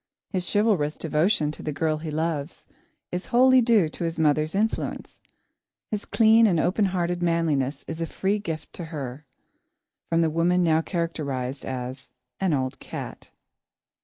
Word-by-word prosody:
His 185 -3 -2
chivalrous 205 -9 +2
devotion 155 0 +1
to - - -9
the 155 - -3
girl 155 +1 0
he 155 0 -5
loves 155 0 -3 0.5
is 180 +1 -4
wholly 255 +1 +6
due 225 -7 +4
to 165 - -6
his 165 0 -2
mother's 155 +1 +2
influence. 220 +3 -2 0.7
His 210 -1 -3
clean 225 0 +5
and 175 -5 +2
open 185 +6 +2
hearted 175 -2 -1
manliness 160 -5 0
is 165 0 -5
a 165 - -1
free 200 +5 -1
gift 160 -6 -6
to 170 - -6
her, 145 -3 -6 0.8
from 165 0 +2
the 160 -1 +2
woman 175 +3 +2
now 160 -1 +3
characterised 145 -7 -3
as 130 0 -5 0.3
"an 190 -2 +1
old 130 -3 -1
cat." - - -8
165 Hz, 155 wpm, -25 LUFS, 150-185 Hz, 0.8 s, wholly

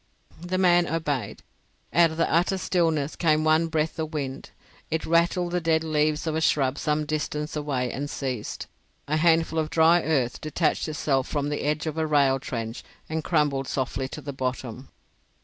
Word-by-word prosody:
The 180 +1 -2
man 175 -2 +4
obeyed. 145 -9 -3 0.5
Out 170 +1 +5
of 160 - -7
the 165 - +2
utter 175 +3 +2
stillness 160 -6 0
came 155 -2 +2
one 155 +1 +3
breath 160 0 -1
of 155 0 -3
wind. 135 -2 -4 0.4
It 160 0 -1
rattled 170 +1 +2
the 180 0 0
dead 160 -1 +2
leaves 155 0 0
of 160 -1 -1
a 160 - 0
shrub 135 -3 +2
some 150 0 0
distance 150 0 -3
away 135 -5 -1
and 145 +1 -4
ceased. 130 -7 -4 0.4
A 155 +2 +1
handful 165 0 +3
of 155 -1 -1
dry 165 +2 +5
earth 135 -7 0
detached 155 +2 0
itself 145 -4 0
from 145 -1 -2
the 150 - -2
edge 150 +2 -1
of 160 0 -3
a 160 - 0
rail 140 -3 +3
trench 115 -3 -5 0.3
and 160 0 -2
crumbled 145 -5 +1
softly 130 0 -2
to 150 - -8
the 140 0 -6
bottom. 130 -1 -4
155 Hz, 180 wpm, -25 LUFS, 140-160 Hz, 0.5 s, Out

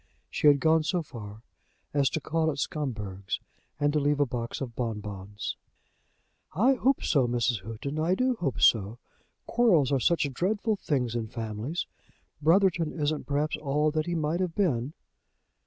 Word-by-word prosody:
She - - +2
had 145 -1 +7
gone 160 +1 +4
so 170 +2 -1
far 110 -6 -10 0.5
as 140 -2 +3
to 160 - -2
call 160 +1 0
at 145 - -3
Scumberg's, 105 - -3 0.4
and 145 0 +2
to 150 - +3
leave 145 0 +1
a 145 - +4
box 120 -2 -4
of 125 -4 -5
bonbons. 105 -3 -4 1.0
"I 240 - +4
hope 265 +1 +1
so, 135 -5 +3
Mrs. 120 -3 0
Houghton; 115 +9 -5
I 170 +4 +2
do 255 +4 +2
hope 165 - -2
so. 110 0 +4 0.5
Quarrels 180 - +3
are 135 - +3
such 165 +2 +2
dreadful 210 - 0
things 125 - -1
in 115 -2 -2
families. 115 - -4 0.6
Brotherton 170 0 +3
isn't, 150 -1 -2
perhaps, 145 +2 0
all 150 +1 +1
that 155 +1 -1
he 175 - -1
might 160 +1 0
have 180 -3 -1
been." 145 - 0
145 Hz, 160 wpm, -28 LUFS, 120-165 Hz, 1.0 s, had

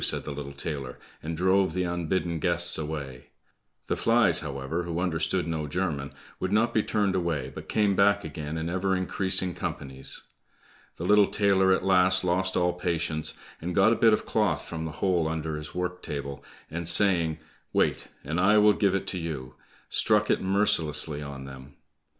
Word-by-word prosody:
said - - +3
the 75 - -6
little 70 -1 -6
tailor, 70 -2 -5 0.2
and 80 +1 -5
drove 95 -1 +2
the 90 - 0
unbidden 85 -1 -1
guests 85 +1 +1
away. 75 -5 -6 0.6
The - - -1
flies, 115 -8 +3
however, 70 +3 -4
who 85 -1 -3
understood 85 -4 0
no 80 -2 -3
German, 75 -4 -2 0.3
would 95 - -2
not 115 +3 +2
be 110 - +3
turned 105 -2 0
away, 80 -8 -2
but - - -9
came 105 -2 +2
back 100 +1 +3
again 75 0 -5
in 80 +1 -3
ever 95 +2 0
increasing 95 0 +1
companies. 65 -4 -5 0.7
The - - -7
little 105 +1 +5
tailor 100 -2 +3
at 95 - +1
last 95 -1 +4
lost 95 +1 +1
all 90 0 +2
patience, 80 -3 -1 0.2
and 85 +1 -4
got 110 +4 +5
a - - +1
bit 115 -1 +5
of 105 - +1
cloth 105 -8 0
from 80 -1 -5
the 80 - -5
hole 90 -4 +2
under 80 -1 -3
his 75 0 -8
work 90 0 -3
table, 70 -1 -6 0.3
and 85 +1 +2
saying, 85 -4 +3 0.3
"Wait, - - +1 0.2
and 80 +5 -2
I 105 +4 +5
will 105 0 +6
give 100 -2 +1
it 95 - -2
to 95 - -3
you," 75 -6 -5 0.3
struck - - +2
it - - +1
mercilessly 80 -6 +1
on 70 -2 -7
them. 65 +1 -11
85 Hz, 180 wpm, -27 LUFS, 75-95 Hz, 0.7 s, will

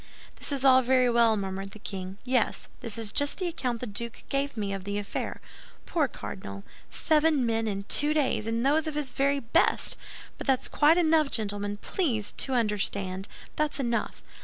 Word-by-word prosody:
"This - - 0
is 275 -1 -1
all 260 -1 +7
very 255 -1 +3
well," 230 -2 +4
murmured 195 0 -4
the - - -9
king, 190 -2 -6
"yes, 250 -3 0
this 230 -4 -3
is 220 -2 -4
just 285 +5 +1
the 370 - -1
account 250 -8 -2
the - - -2
duke 235 +2 -5
gave 280 -2 -1
me 200 -2 -2
of 195 -1 -4
the 200 +1 -3
affair. 205 -1 -3 0.5
Poor 315 -5 +1
cardinal! 100 - -7 0.3
Seven 305 -4 +2
men 225 -1 0
in 200 -1 -2
two 290 +8 +1
days, 280 -7 +1
and 230 +2 0
those 310 +3 +3
of 310 - -3
his 290 -4 -3
very 280 +1 +2
best! 270 +6 +1 0.4
But - - -6
that's 265 -2 +2
quite 310 +3 +5
enough, 315 -3 +4
gentlemen; 205 -2 -1
please 230 - 0
to 265 - -1
understand, 200 -4 0 0.3
that's 305 -1 0
enough. 240 -3 -1
240 Hz, 185 wpm, -28 LUFS, 205-285 Hz, 0.5 s, all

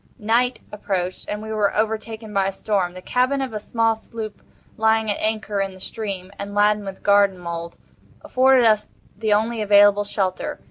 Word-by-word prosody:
Night 240 +3 +1
approached, 190 -3 -3
and 210 +1 -4
we 220 0 -5
were 210 -2 +1
overtaken 220 0 -2
by 195 -1 +2
a - - -1
storm. 195 -3 -1
The 185 - -9
cabin 255 +3 +1
of 265 -4 -3
a 215 - -3
small 225 +1 +1
sloop 220 -1 -8 0.3
lying 220 -1 +2
at - - -2
anchor 215 -2 -1
in 195 -1 -3
the - - -14
stream, 195 -3 -5
and 200 0 -6
laden 210 0 +3
with 195 -1 -8
garden 200 -2 +4
mould, 170 -1 -6 0.5
afforded 260 -1 +4
us 215 -2 +3 0.3
the 215 +2 -2
only 220 +2 +1
available 205 0 +5
shelter. 195 -2 -2
210 Hz, 180 wpm, -22 LUFS, 195-220 Hz, 0.5 s, available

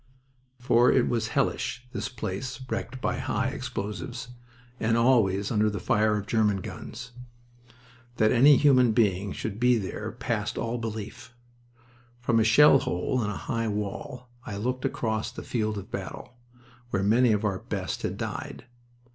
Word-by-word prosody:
For 120 0 +4
it 130 - +3
was 115 -2 0
hellish, 120 +2 -1
this - - -3
place 125 +2 -5
wrecked 130 +1 -4
by - - -1
high - - -1
explosives 115 +4 -5 0.5
and 115 +1 +2
always 105 -5 +3
under 110 -1 +3
the 100 -1 -4
fire 105 +2 +2
of 105 - -4
German 105 -3 +1
guns. 120 +6 -8 1.0
That 110 -2 +3
any 135 +4 +7
human 130 -5 +5
being 100 -4 +1
should 110 +1 -5
be 125 0 +4
there 105 +2 -4
passed 115 -2 -3
all 120 +1 -2
belief. 115 +2 -7 0.8
From 120 -1 +2
a - - +4
shell 135 +5 +7
hole 115 +7 -1
in 105 - -1
a 105 - -4
high 115 -1 -1
wall 105 +4 -4 0.2
I 100 - -6
looked 125 +4 -2
across 110 -2 -1
the - - -8
field 110 -3 -2
of 100 - -8
battle, - - -6 0.6
where 95 -4 0
many 115 +4 +4
of 105 0 +1
our 95 -3 -1
best - - -4
had - - -3
died. - - -5
115 Hz, 155 wpm, -27 LUFS, 105-125 Hz, 1.0 s, any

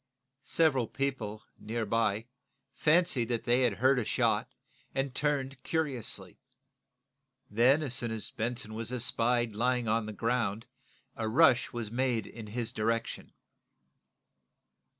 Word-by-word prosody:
Several 135 -5 +2
people, 115 -7 -3 0.2
near 115 +1 -3
by, 110 0 +1 0.5
fancied 155 -7 +3
they 120 +1 +2
had 120 -4 +3
heard 130 +5 +3
a - - 0
shot, - - +1 0.5
and 135 -1 -1
turned, 135 -2 -1
curiously. 130 - -2 1.1
Then, 125 +8 +4
as 135 -5 -2
soon 120 -1 +1
as 110 -1 -4
Benson 115 -1 -3
was 115 +2 -4
espied 120 -1 +1
lying 125 +1 +1
on 110 0 +1
the - - -4
ground 115 -1 -1 0.5
a 110 -4 -2
rush 130 0 +4
was 115 -3 -5
made 120 -2 0
in 110 -2 -9
his 115 +2 -3
direction. 115 +1 -2
120 Hz, 125 wpm, -30 LUFS, 110-130 Hz, 1.1 s, Then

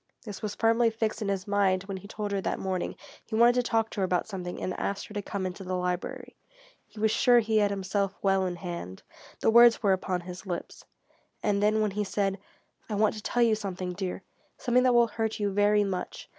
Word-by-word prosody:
This 210 -5 -8
was 210 -2 -4
firmly 230 +1 +3
fixed 225 0 -2
in 210 - -2
his 195 0 -2
mind 200 -2 +2
when 195 -1 -5
he 190 - -11
told 210 -1 -4
her 200 -1 0
that - - -2
morning 190 -2 -3 0.3
he 220 - -5
wanted 235 +2 +6
to 250 - +2
talk 225 -2 0
to - - -5
her - - +1
about 180 -1 0
something 180 -4 -5
and 185 - -2
asked 200 0 -2
her - - -12
to 205 - -2
come 200 -1 -4
into 185 +1 -5
the 185 0 -3
library. 180 0 -3 0.5
He 215 - -13
was 220 0 +2
sure 245 +1 +5
he 220 -1 +2
had 205 -1 +3
himself 200 0 -1
well 195 -1 +3
in 180 - -3
hand; 170 - -7 0.4
the - - +3
words 235 0 +7
were 200 -2 +4
upon 185 -1 -2
his 180 +2 -9
lips. 175 -2 -5 0.6
And 200 -1 +1
then 215 +1 +3
when 210 -1 +1
he 210 +2 -1
said: 195 -1 -1 0.5
"I 210 - -2
want 210 0 +3
to 215 - -7
tell 240 +3 +1
you 230 -2 +4
something, 185 -4 -3
dear 185 0 -4 0.3
something 250 0 +2
that 250 -1 +3
will 240 0 +6
hurt 220 0 -3
you 205 -1 0
very 205 +1 +3
much. 190 -2 -4
205 Hz, 230 wpm, -28 LUFS, 190-220 Hz, 0.6 s, words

